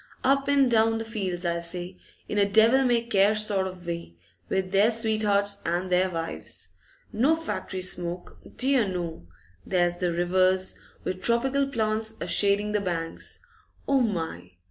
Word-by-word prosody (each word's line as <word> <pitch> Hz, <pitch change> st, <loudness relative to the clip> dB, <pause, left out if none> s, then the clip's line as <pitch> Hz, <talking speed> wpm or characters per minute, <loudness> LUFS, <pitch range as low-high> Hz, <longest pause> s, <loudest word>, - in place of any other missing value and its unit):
Up 275 Hz, +1 st, +2 dB
an' 280 Hz, -2 st, +4 dB
down 225 Hz, -1 st, +3 dB
the 225 Hz, -, -4 dB
fields, 190 Hz, -5 st, -4 dB
I 170 Hz, 0 st, 0 dB
say, 175 Hz, +2 st, -4 dB, 0.3 s
in 210 Hz, -, -1 dB
a 200 Hz, 0 st, +3 dB
devil 230 Hz, +5 st, +5 dB
may 240 Hz, -2 st, +2 dB
care 210 Hz, -2 st, +3 dB
sort 205 Hz, -3 st, 0 dB
of 185 Hz, -1 st, -10 dB
way, 170 Hz, -, -5 dB, 0.3 s
with 190 Hz, -1 st, -1 dB
their 200 Hz, +3 st, +4 dB
sweethearts 210 Hz, -3 st, +1 dB
and 175 Hz, +2 st, -2 dB
their 185 Hz, +1 st, +3 dB
wives. 165 Hz, -2 st, -5 dB, 0.4 s
No 265 Hz, +9 st, +3 dB
factory 320 Hz, -, -4 dB
smoke, 175 Hz, -1 st, -3 dB, 0.2 s
dear 260 Hz, -4 st, +3 dB
no! 170 Hz, -, -5 dB, 0.4 s
There's 175 Hz, -1 st, +1 dB
the 175 Hz, -1 st, 0 dB
rivers, 185 Hz, +2 st, +2 dB, 0.3 s
with 185 Hz, 0 st, -4 dB
tropical 265 Hz, +5 st, +2 dB
plants 220 Hz, -3 st, -1 dB
a -, -, -3 dB
shading 205 Hz, +1 st, +2 dB
the 210 Hz, -1 st, 0 dB
banks, 165 Hz, -3 st, -4 dB, 0.5 s
O 275 Hz, -1 st, +3 dB
my! 160 Hz, -, -3 dB
200 Hz, 155 wpm, -26 LUFS, 180-225 Hz, 0.5 s, devil